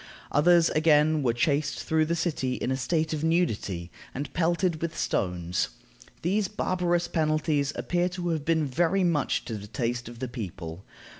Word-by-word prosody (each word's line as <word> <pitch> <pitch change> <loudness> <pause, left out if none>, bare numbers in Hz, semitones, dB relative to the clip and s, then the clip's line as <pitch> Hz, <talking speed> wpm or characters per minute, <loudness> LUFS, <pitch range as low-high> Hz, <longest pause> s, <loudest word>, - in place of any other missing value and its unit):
Others 170 +3 +5
again 155 0 +4
were 125 -4 +2
chased 145 +5 0
through 160 0 +2
the 170 - +1
city 150 -7 -1
in 130 - -2
a - - +1
state 155 +4 0
of 155 0 -3
nudity, 110 - 0 0.2
and 140 0 -4
pelted 170 -1 +1
with 170 -1 -3
stones. 90 -2 -1 0.5
These 195 +4 +1
barbarous 175 -3 0
penalties 155 -3 +1
appear 175 0 0
to 175 -1 -2
have 160 -3 -1
been 160 -1 +2
very 175 +8 +1
much 170 -5 +1
to 115 - -5
the 100 - -9
taste 120 0 -2
of 120 - -11
the 130 - -3
people. 90 -7 -7
155 Hz, 165 wpm, -27 LUFS, 125-170 Hz, 0.5 s, Others